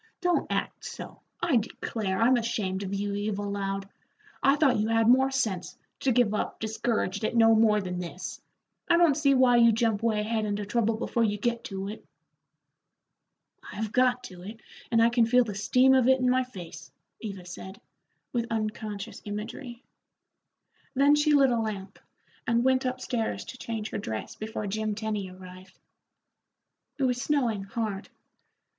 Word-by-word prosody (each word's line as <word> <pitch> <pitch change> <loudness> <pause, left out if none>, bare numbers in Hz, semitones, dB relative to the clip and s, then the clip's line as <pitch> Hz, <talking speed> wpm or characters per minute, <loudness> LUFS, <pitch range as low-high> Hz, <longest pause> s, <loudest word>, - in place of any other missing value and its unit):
Don't 355 -1 0
act - - -2
so. - - -8 0.2
I 335 -7 +3
declare, 210 -3 -3
I'm 245 +3 +5
ashamed 210 -5 -1
of 195 -1 -4
you, 200 0 -2
Eva 205 0 -2
Loud. 195 -1 -3 0.5
I 275 - +5
thought 275 -7 +3
you 215 - +1
had 225 0 +2
more 260 +2 +5
sense, 220 -10 -2 0.2
to 265 - +1
give 240 -3 +3
up 210 - -2
discouraged 220 -2 -1
at 220 - -1
no 225 -1 +6
more 220 -1 +4
than 180 -2 -4
this. 175 -2 -6 0.5
I 340 - +6
don't 335 -5 +5
see 280 -2 +3
why 255 -2 +5
you 235 -1 +7
jump 225 -2 +1
way 225 -2 +1
ahead 220 +1 -1
into 205 0 -2
trouble 225 +1 +1
before 235 0 0
you 210 -2 +1
get 235 +2 -1
to 195 -1 -5
it." 210 +2 -7 1.7
"I've 215 0 -4
got 250 0 +2
to 180 -6 -10
it, 215 +5 -9 0.3
and 230 -1 +4
I 230 - +5
can 235 -1 +3
feel 250 +2 +5
the 215 -3 -5
steam 250 +6 +4
of 260 -2 +4
it 265 0 +5
in 250 0 +2
my 255 0 +2
face," 165 - -10 0.3
Eva 195 -5 -7
said, 190 +2 -9 0.5
with 235 -1 -1
unconscious 215 -2 -4
imagery. 230 +4 -6 1.1
Then 280 +2 +5
she 295 0 +3
lit 275 -3 +5
a 235 - +1
lamp, 210 -3 -4 0.5
and 235 0 +2
went 260 0 +2
up 255 0 -3
stairs 235 -4 -2
to 255 - -9
change 220 -2 -4
her - - -3
dress 110 - -5
before 215 0 -5
Jim 215 +1 -2
Tenny 210 -3 -3
arrived. 185 0 -13 1.2
It 275 - -1
was 250 -1 +1
snowing 255 -8 +1
hard. 205 -1 -4
225 Hz, 170 wpm, -28 LUFS, 205-250 Hz, 1.7 s, you